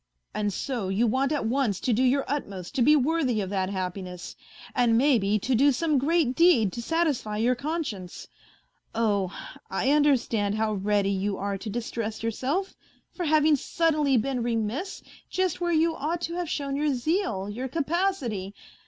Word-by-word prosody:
And 210 -1 -1
so 230 -2 -3
you 200 +5 +2
want 260 +5 +1
at 295 -6 -1
once 230 -4 0
to 250 - +1
do 230 - +1
your 265 +2 +2
utmost 200 -11 -4
to 270 - 0
be 295 +6 +6
worthy 280 -4 +1
of 195 -2 -3
that 190 -2 0
happiness, 185 -2 -5 0.4
and 240 -3 +3
maybe 230 -6 +3
to 255 +6 -1
do 275 +4 +5
some 300 +1 +1
great 300 -2 +2
deed 315 - +4
to 235 - -4
satisfy 290 -8 0
your 235 +4 +2
conscience. 250 - -4 0.7
Oh! 205 -5 +1 0.4
I 250 +8 +1
under 295 -2 +5
stand 210 -3 -1
how 215 0 0
ready 200 0 +1
you 195 0 -1
are 200 0 -2
to 215 - -6
distress 225 0 -4
yourself 275 - -2 0.4
for 355 - -3
having 310 0 +4
suddenly 300 -2 +1
been 250 +2 -1
remiss 235 - -2 0.3
just 370 -2 -1
where 345 0 +1
you 325 0 +2
ought 320 +4 -2
to 335 - -3
have 350 -2 -3
shown 280 -3 -2
your 290 -1 +1
zeal, 250 - -1
your 240 +6 -4
capacity 280 - -1
250 Hz, 170 wpm, -26 LUFS, 210-300 Hz, 0.7 s, be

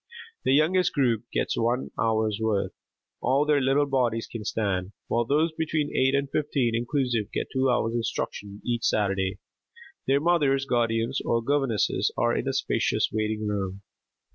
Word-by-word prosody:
The 130 - +4
youngest 180 +5 +3
group 120 -5 +1
gets - - 0
one 120 +3 0
hour's 110 -1 0
work, 110 -3 0 0.5
all 135 +3 +2
their 150 -2 +3
little 135 +2 +3
bodies 125 -5 0
can 115 -2 -7
stand, 95 -2 -2
while 120 0 +1
those 155 +6 +2
between 155 -2 -2
eight 130 +1 +3
and 140 0 0
fifteen 135 -4 0
inclusive 120 -2 -1
get - - -3
two 130 0 +2
hours 115 -2 +1
instruction 105 -3 -4
each 120 -2 -1
Saturday. 95 -2 +1 0.7
Their 135 +1 +4
mothers, 145 -5 +2
guardians 120 0 0
or 115 -1 0
governesses 135 -5 +1
are - - +2
in - - -2
a - - 0
spacious - - +1
waiting 110 0 -1
room. 100 -1 -3
120 Hz, 155 wpm, -26 LUFS, 110-140 Hz, 0.7 s, The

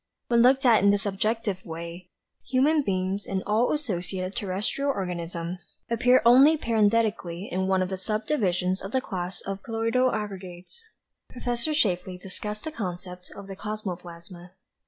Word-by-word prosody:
When 235 -1 +5
looked 265 +3 +5
at 230 -5 +6
in 200 - +6
this 205 +2 +2
objective 205 -1 -1
way, 170 +2 -7 0.4
human 285 +5 +3
beings, 190 -3 -1
and 190 -1 -2
all 220 +4 +2
associated 190 - -2
terrestrial 215 +6 -1
organisms, 175 -4 -4
appear 245 +2 +4
only 270 +7 +7
parenthetically 215 - +1
in 190 +1 0
one 190 -1 +2
of 185 - -3
the 190 - -3
subdivisions 190 -3 0
of 195 +2 -7
the 260 - +3
class 185 -5 -5
of 195 0 -5
colloidal 230 +3 +1
aggregates." 195 - -6 0.5
Prof. 245 -1 -3 0.2
Shapley 185 - +1
discussed 210 +3 -5
the 315 - -4
concept 180 - -6
of 200 - -9
the 195 0 -8
cosmoplasma. 180 -4 -7
200 Hz, 145 wpm, -26 LUFS, 180-230 Hz, 0.5 s, only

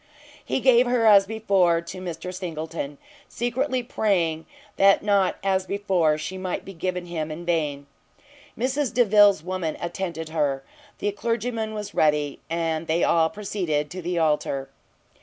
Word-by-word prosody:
He 265 - -2
gave 250 -1 +5
her, 245 -2 +2
as 200 -2 +7
before, 195 -6 +2
to 170 +2 -8
Mr 180 0 -6
Singleton, 160 -5 -5 0.3
secretly 250 +2 -1
praying 175 -9 0 0.3
that 195 0 +5
not, 200 -2 +2
as 190 -1 +1
before, 185 -6 +1
she 185 +5 -5
might 185 -1 -4
be 195 - -8
given 180 +1 -3
him 160 -3 -4
in 160 +3 -7
vain: 150 -5 -1 0.7
Mrs 260 +2 0
Delvile's 205 -6 +5
woman 180 -3 -3
attended 170 -2 -4
her; 140 -4 -1 0.3
the 205 - -1
clergyman 225 +1 -2
was 210 -1 -6
ready, 150 -2 +1
and 165 -1 -1
they 165 +2 +1
all 165 -1 +3
proceeded 170 -8 -2
to 185 - -6
the 175 +1 -2
altar. 150 -4 0
185 Hz, 145 wpm, -24 LUFS, 160-205 Hz, 0.7 s, as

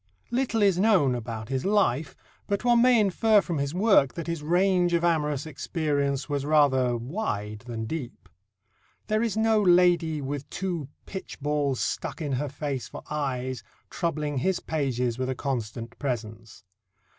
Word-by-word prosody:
Little 240 -3 +1
is 195 -3 +3
known 190 - +4
about 115 -2 -5
his 130 -1 -1
life, 160 -9 +1 0.3
but 200 +3 -1
one 240 -1 +5
may 250 -1 +5
infer 215 +2 +4
from 170 -6 -2
his 140 +3 -2
work 190 - +4
that 170 - -4
his 170 -2 -3
range 175 +2 +2
of 170 - 0
amorous 150 -4 +1
experience 140 -3 -1
was 145 -1 -2
rather 135 -5 +3
wide 115 - -3
than 115 -2 -4
deep. 130 -2 -6 0.8
There 215 0 +1
is 225 -2 -1
no 220 -1 +3
lady 175 -4 +4
"with 140 0 -5
two 175 -7 -3 0.2
pitch 190 - -7
balls 145 -2 0
stuck - - -3
in 150 -4 -3
her 140 +2 -1
face 140 -2 -4
for - - -9
eyes" 130 -4 -2 0.3
troubling 150 -4 -2
his 185 +7 0
pages 125 -6 -1
with 130 0 -1
a 130 - -1
constant 115 -3 -4
presence. 110 -5 -5
150 Hz, 155 wpm, -26 LUFS, 130-180 Hz, 0.8 s, one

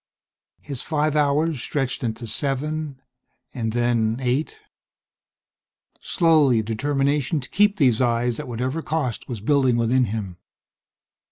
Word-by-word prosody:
His 140 -4 -5
five 150 -1 0
hours 150 -1 +1
stretched 135 -2 -2
into 115 0 -3
seven, 145 +4 -3 0.5
and 115 -3 -2
then, 115 -1 +1
eight. 130 - -1 1.4
Slowly 155 -7 +3
a - - -7
determination 140 +6 0
to 130 - -8
keep 205 +1 +3
these 125 -5 +3
eyes, 120 -1 +1
at - - -6
whatever 130 +6 -2
cost, 150 -8 -3
was 115 -5 -5
building 130 0 +2
within 120 +2 +2
him. 100 -5 -5
130 Hz, 120 wpm, -23 LUFS, 120-150 Hz, 1.4 s, Slowly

